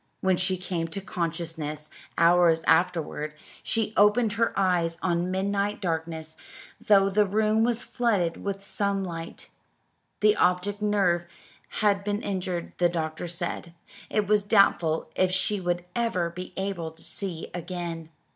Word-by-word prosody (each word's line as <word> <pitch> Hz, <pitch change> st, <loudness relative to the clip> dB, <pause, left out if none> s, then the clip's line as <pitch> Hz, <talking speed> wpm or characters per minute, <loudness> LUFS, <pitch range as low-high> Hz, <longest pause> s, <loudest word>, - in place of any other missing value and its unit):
When 190 Hz, -1 st, +3 dB
she 185 Hz, +1 st, +1 dB
came 175 Hz, -2 st, -3 dB
to 165 Hz, +4 st, -5 dB
consciousness, 165 Hz, -5 st, -4 dB, 0.3 s
hours 170 Hz, -1 st, +5 dB
afterward, 160 Hz, -3 st, +1 dB, 0.3 s
she 225 Hz, -1 st, -1 dB
opened 210 Hz, +2 st, +4 dB
her 230 Hz, +1 st, +1 dB
eyes 175 Hz, -4 st, +1 dB
on 175 Hz, 0 st, +1 dB
midnight 200 Hz, +2 st, -1 dB
darkness, 160 Hz, -3 st, -3 dB, 0.5 s
though 195 Hz, -2 st, +5 dB
the 205 Hz, +1 st, +3 dB
room 215 Hz, +2 st, +2 dB
was 240 Hz, 0 st, 0 dB
flooded 200 Hz, -9 st, 0 dB
with 195 Hz, -1 st, -3 dB
sunlight. 195 Hz, -5 st, -3 dB, 0.7 s
The 210 Hz, 0 st, +5 dB
optic 180 Hz, +3 st, +1 dB
nerve 190 Hz, -5 st, +2 dB, 0.6 s
had 200 Hz, -1 st, +3 dB
been 205 Hz, +1 st, -2 dB
injured, 185 Hz, -3 st, -3 dB
the 175 Hz, -1 st, +4 dB
doctor 160 Hz, 0 st, -3 dB
said. 170 Hz, 0 st, -5 dB, 0.3 s
It 210 Hz, -1 st, +1 dB
was 210 Hz, 0 st, +3 dB
doubtful 175 Hz, -7 st, +3 dB
if 185 Hz, -, +3 dB
she 190 Hz, +2 st, +1 dB
would 175 Hz, 0 st, -1 dB
ever 185 Hz, -8 st, 0 dB
be 180 Hz, +2 st, -8 dB
able 190 Hz, -4 st, -2 dB
to 160 Hz, 0 st, -16 dB
see 180 Hz, -5 st, -4 dB
again. 170 Hz, -2 st, -5 dB
180 Hz, 135 wpm, -27 LUFS, 170-200 Hz, 0.7 s, hours